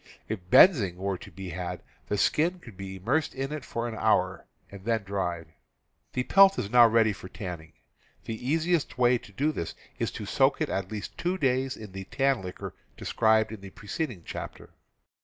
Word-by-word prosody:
If 110 -2 -3
benzin 110 - +7
were 95 0 -3
to - - -11
be 95 -1 -8
had, 90 0 -5 0.2
the 105 - -1
skin 170 - +2
could 120 - -13
be 95 0 -7
immersed 130 +12 0
in 135 +2 -3
it 150 -3 -4
for 115 -1 -3
an 115 - -5
hour 110 - +1 0.2
and 100 -1 -10
then 115 -1 0
dried. 85 -5 -3 0.6
The 125 - 0
pelt 195 +5 +6
is 100 - -3
now 120 -1 +8
ready 110 -1 +3
for 95 -2 -10
tanning. 85 -5 -7 0.5
The 115 +3 -4
easiest 165 -2 +1
way 125 -1 +4
to 105 - -15
do 145 +9 0
this 85 - -5 0.2
is - - 0
to - - -6
soak - - +2
it - - 0
at 95 0 -2
least 105 -2 -6
two 180 +2 0
days 130 -3 +1
in 105 -3 -9
the 95 0 -7
tan 135 +1 +1
liquor 90 -1 -7 0.2
described 110 -1 +2
in 110 -3 -8
the 100 - -9
preceding 105 - -5
chapter. - - -7
110 Hz, 195 wpm, -28 LUFS, 95-135 Hz, 0.6 s, now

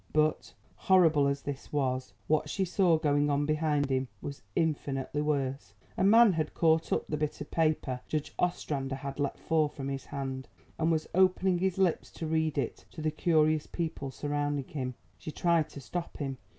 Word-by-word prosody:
But, 155 0 +1 0.2
horrible 160 -7 +4
as 140 0 -1
this 140 -2 -6
was, 130 -3 -1
what 155 -1 +1
she 190 +3 0
saw 175 -2 +3
going 145 -2 +2
on 145 0 +1
behind 150 -2 +1
him 130 0 +1
was 140 -1 -7
infinitely 145 -3 -1
worse. 140 -2 -2 0.2
A - - 0
man 220 +1 +7
had 155 -2 -2
caught 160 -1 +3
up - - +1
the 150 - -2
bit 150 0 -2
of 150 - -8
paper 155 -6 0
Judge 155 -2 -3
Ostrander 140 -6 -1
had 140 +1 -6
let 140 -1 -1
fall 160 -2 +1
from 135 -1 -6
his 135 -1 -4
hand 135 -2 -5 0.3
and 160 +1 +2
was 160 -1 0
opening 185 0 +3
his 190 0 0
lips 185 -4 +1
to 165 - -5
read 160 -1 0
it 135 -4 -2
to - - -11
the 155 0 0
curious 155 -1 +2
people 160 -5 -3
surrounding 145 0 -2
him. 130 -4 -4 0.2
She 155 - -6
tried 170 -1 +2
to - - -9
stop 170 +6 -5
him. 135 -3 -4
150 Hz, 185 wpm, -30 LUFS, 140-160 Hz, 0.3 s, man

